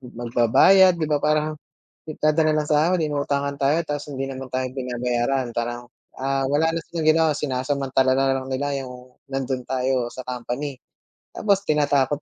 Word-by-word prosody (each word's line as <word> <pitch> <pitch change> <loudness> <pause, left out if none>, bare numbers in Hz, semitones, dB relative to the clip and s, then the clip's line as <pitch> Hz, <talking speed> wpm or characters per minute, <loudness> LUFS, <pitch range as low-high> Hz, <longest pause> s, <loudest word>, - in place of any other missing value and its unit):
magbabayad, 125 - +4
di 155 - -1
ba 145 - +3
parang 155 0 +1 0.5
nagdadala 155 0 +1
ng 150 - -7
sahod, 165 +4 +3
inuutangan 140 -2 -1
tayo, 140 +3 +2
tas 145 -1 -4
hindi 135 0 -3
naman 135 0 -6
tayo 130 0 0
binabayaran. 125 0 -1
Parang, 120 +1 -3 0.3
ah, 135 0 -1
wala 150 +4 +2
na - - -1
silang 165 -2 -3
ginawa, 160 0 +4
sinasamantala 130 -1 0
na 135 0 +2
lang 130 0 -6
nila 140 0 -2
yung 125 0 -12
nandun 130 -2 -3
tayo 130 -1 0
sa 130 - -6
company. 125 +3 -4 0.6
Tapos 200 -2 +1
tinatakot 145 -1 +1
135 Hz, 150 wpm, -23 LUFS, 130-150 Hz, 0.6 s, magbabayad